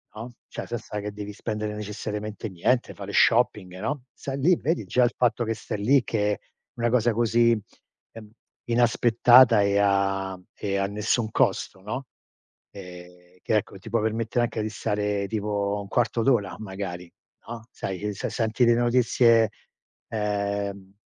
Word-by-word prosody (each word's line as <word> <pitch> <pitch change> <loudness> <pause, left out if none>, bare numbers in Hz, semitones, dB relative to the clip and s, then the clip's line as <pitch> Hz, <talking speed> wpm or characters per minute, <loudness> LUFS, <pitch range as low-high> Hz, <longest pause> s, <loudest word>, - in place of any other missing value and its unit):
no, 115 +3 -7 0.2
cioè - - -6
senza 115 -3 -5
che 105 - -5
devi 105 0 -7
spendere 105 0 -4
necessariamente 105 +1 -5
niente, 120 +8 0
fare 100 0 -8
shopping, 105 -6 +2
no, 130 +5 -3
stai 135 0 -5
lì, 175 +6 +4
vedi, 165 +3 -1
già 125 - +2
il 120 - +2
fatto 120 -1 +2
che 115 0 -1
stai 105 - -6
lì 135 +3 +5
che 105 -2 0
è - - -6 0.4
una 120 0 +1
cosa 120 -1 +3
così, 115 0 +3 0.5
ehm, 110 -2 -12 0.4
inaspettata 120 0 +5
e 100 0 +2
a 100 -1 +1
e 100 -1 -2
a 100 - +1
nessun 105 +2 -1
costo, 95 - 0
no. 130 +7 -5 0.7
Ehm, 90 -2 -12
che 110 - +1
ecco, 100 -1 -4
ti 110 - -11
può 115 0 +1
permettere 115 +2 0
anche 110 - -4
di 110 - -2
stare 105 -1 -2
tipo 105 -1 -1
1/4 115 +2 0
d'ora 110 -7 +2
magari, 95 -4 -6 0.4
no, 115 0 -8
sai, 95 0 -5
uhm, 105 - -1
se 100 - -4
senti 115 +1 0
le 120 - +5
notizie, 120 -2 +4 0.6
ehm 100 -2 -3
105 Hz, 155 wpm, -25 LUFS, 100-120 Hz, 0.7 s, lì